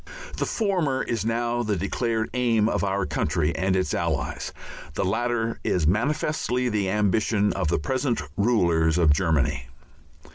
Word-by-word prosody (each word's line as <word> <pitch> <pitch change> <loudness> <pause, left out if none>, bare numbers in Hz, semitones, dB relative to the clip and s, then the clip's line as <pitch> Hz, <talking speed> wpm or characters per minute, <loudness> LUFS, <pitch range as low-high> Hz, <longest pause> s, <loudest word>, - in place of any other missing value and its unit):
The - - -1
former 180 - 0
is 115 -3 -2
now 120 +1 0
the 105 -3 0
declared 110 +4 -1
Aim 115 -4 +2
of - - 0
our 100 -1 0
country 80 0 0
and 95 +2 +1
its 95 -1 0
Allies; - - -2 0.4
the - - 0
latter 115 +3 -1
is 90 -4 +1
manifestly 125 - 0
the 105 -4 0
ambition 105 +1 +1
of 90 -3 -1
the 80 - +1
present 130 - -1 0.2
rulers 85 -7 +2
of 80 -4 +5
Germany. 75 -5 0
105 Hz, 145 wpm, -25 LUFS, 90-120 Hz, 0.4 s, of